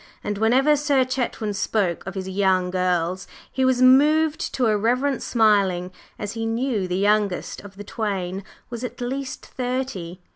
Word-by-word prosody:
And 205 -1 -3
whenever 260 +7 +4
Sir 285 -3 +2
Chetwynd 245 -5 -2
spoke 195 -4 -1
of 190 - -6
his 190 -1 -4
"young 190 -1 +1
girls" 180 0 -1 0.2
he 265 - -1
was 255 -1 +3
moved 300 +4 +4
to 255 - +1
irreverent 240 +5 +1
smiling, 200 -6 +2 0.3
as 205 -1 -4
he 225 0 -3
knew 225 -4 -1
the 180 0 -2
youngest 205 -1 0
of 200 -1 -13
the 205 - -8
twain 195 -3 -3 0.3
was 235 0 -5
at 245 -1 -6
least 260 +2 -4
thirty. 245 -9 -4
215 Hz, 155 wpm, -23 LUFS, 190-255 Hz, 0.3 s, whenever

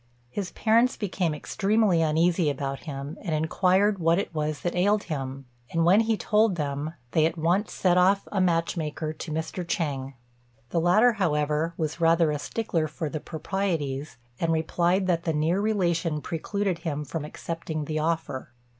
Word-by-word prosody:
His 195 +2 -3
parents 230 +3 +3
became 180 -6 -1
extremely 200 +2 +1
uneasy 165 +1 +2
about 135 0 -4
him, 140 0 -6
and 165 -6 -2
inquired 185 +6 +2
what 165 0 +3
it 195 - -2
was 155 -1 -2
that 175 - -1
ailed 205 +3 +2
him; 135 -3 -5 0.3
and 165 0 +2
when 185 +5 +6
he 225 -1 +2
told 210 -2 +2
them, 150 +1 -3 0.2
they 155 - +3
at 170 - -5
once 175 +6 +1
sent 180 -1 +2
off 195 +2 +3
a 195 - +1
match 170 -2 +1
maker 155 -1 -3
to 155 - -7
Mr. 160 +3 -3
Chêng. 140 -6 -2 0.6
The 170 - +1
latter, 215 +8 +5
however, 155 -3 0
was 160 +1 -3
rather 165 -1 +4
a 150 - -2
stickler 170 -3 -1
for 155 +1 -4
the 155 - -4
proprieties, 155 -6 -3 0.2
and 165 -1 +1
replied 170 +4 +1
that 175 -2 +1
the 165 - +1
near 160 +6 +1
relationship 170 -7 0
precluded 190 +2 -2
him 150 -3 -3
from 160 +1 -4
accepting 155 0 -5
the 155 +1 -2
offer. 155 -4 -2
165 Hz, 170 wpm, -26 LUFS, 155-185 Hz, 0.6 s, when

